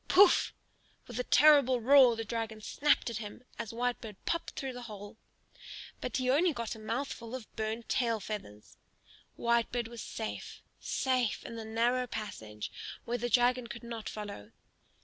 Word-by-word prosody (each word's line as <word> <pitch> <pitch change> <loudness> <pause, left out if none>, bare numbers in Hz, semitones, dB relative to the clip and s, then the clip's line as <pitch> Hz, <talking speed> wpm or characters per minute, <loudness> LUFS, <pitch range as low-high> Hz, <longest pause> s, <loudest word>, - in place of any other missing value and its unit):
Pouf! 390 0 +6 0.5
With - - -6
a - - +1
terrible 285 - +6
roar 255 0 +7
the 225 0 -4
dragon 225 0 -3
snapped 285 +3 +2
at 225 - -3
him 215 +2 -7 0.2
as 230 -2 -3
Whitebird 235 -2 -2
popped 335 - -2
through 270 -2 -3
the 245 - -7
hole; 205 +1 -9 0.8
but - - -2
he 255 - -1
got 270 -4 +2
only 220 - -11
a 220 - -3
mouthful 245 -1 -3
of 250 -4 -9
burnt 220 +1 -3
tail 235 -4 +1
feathers. 190 - -7 0.6
Whitebird 235 0 +1
was 235 0 -8
safe, 220 -1 -6 0.2
safe 255 -4 0
in 230 - -6
the 225 -1 -6
narrow 240 +3 +1
passage 110 - -6 0.3
where 240 +1 -1
the 240 +1 -1
dragon 245 0 +3
could 235 +1 -8
not 230 -2 -5
follow. 200 - -7
235 Hz, 160 wpm, -32 LUFS, 220-255 Hz, 0.8 s, roar